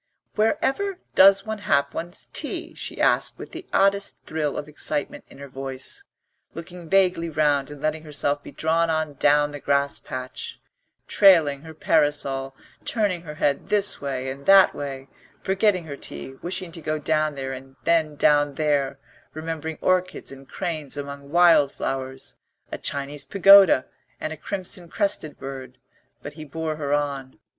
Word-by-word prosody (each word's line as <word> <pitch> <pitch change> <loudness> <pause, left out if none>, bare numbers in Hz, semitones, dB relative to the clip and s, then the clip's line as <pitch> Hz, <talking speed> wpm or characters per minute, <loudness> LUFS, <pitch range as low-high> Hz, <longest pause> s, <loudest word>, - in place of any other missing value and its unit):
"Wherever 300 - 0 0.2
does 195 +1 +6
one 220 -1 -4
have 140 -8 +1
one's 175 +2 -3
tea?" - - -4
she - - -6
asked - - +2
with - - -9
the 340 +1 -9
oddest 200 0 +2
thrill 155 -2 -2
of 145 - -5
excitement 150 -1 -3
in - - -15
her 140 0 -9
voice, 135 - -6 0.5
looking 170 0 -9
vaguely 180 -3 +3
round 145 -3 +1
and 145 0 -10
letting 155 0 -1
herself 145 -1 -1
be - - -11
drawn 165 +3 +1
on 155 -2 -1
down 145 +1 +3
the 145 - -7
grass 140 0 0
path, 130 0 -7 0.7
trailing 160 -8 +5
her 160 0 -11
parasol, 145 -4 +1 0.3
turning 205 -6 0
her 150 -3 -9
head 145 -2 0
this 205 -1 +1
way 135 -2 -3
and 140 +1 -10
that 195 -1 +7
way, 135 -1 -6 0.4
forgetting 190 -2 +1
her 140 -3 -7
tea, 70 - -7
wishing 180 0 -4
to 165 0 -10
go 155 0 -2
down 155 0 0
there 135 -1 -4
and 135 +1 -10
then 160 -3 +2
down 145 -1 +3
there, 145 -3 0 0.4
remembering 160 0 -5
orchids 185 -3 0
and 135 0 -13
cranes 155 -5 -4
among 140 0 -7
wild 165 -4 +5
flowers, 130 0 -4 0.4
a - - -5
Chinese 140 0 -3
pagoda 195 -7 +7 0.3
and 155 - -3
a - - -9
crimson 180 0 -5
crested 195 -8 -2
bird; 130 -2 -8 0.5
but 145 - -7
he 155 +1 -9
bore 155 +1 -4
her 145 -2 -3
on. 140 -3 -2
150 Hz, 160 wpm, -24 LUFS, 140-175 Hz, 0.7 s, that